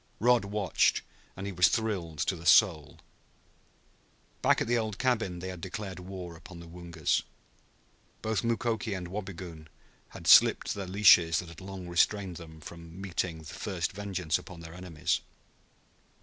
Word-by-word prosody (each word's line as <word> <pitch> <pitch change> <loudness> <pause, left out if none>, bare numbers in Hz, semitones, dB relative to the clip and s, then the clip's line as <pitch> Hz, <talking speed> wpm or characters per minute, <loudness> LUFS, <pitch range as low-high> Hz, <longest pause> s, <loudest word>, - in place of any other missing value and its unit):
Rod 120 -1 +4
watched, 100 -2 +1 0.3
and 95 - -5
he 100 - -3
was 90 -1 +5
thrilled 95 -8 -2
to 95 - 0
the 85 0 -7
soul. 80 -6 +5 1.4
Back - - +4
at - - 0
the 120 - +1
old 110 -3 -1
cabin 115 -8 0
they 95 +2 -6
had 90 -2 -8
declared 95 0 -6
war 90 -2 -8
upon 85 +1 -12
the 85 - -10
Woongas. 85 -2 -1 1.0
Both 110 +1 0
Mukoki 115 -2 -1
and 90 -2 -6
Wabigoon 90 -5 -7 0.4
had - - -11
slipped - - +6
the 100 -2 -5
leashes 90 -4 +6
that 90 - -4
had 85 +1 -12
long 95 -1 -8
restrained 90 +1 +1
them 80 -2 -11
from 85 +2 -11
meting 90 -4 -3
first 85 +3 -3
vengeance 95 -5 -2
upon 85 -2 -11
their 80 0 -10
enemies. 90 -4 -2
90 Hz, 150 wpm, -29 LUFS, 85-100 Hz, 1.4 s, slipped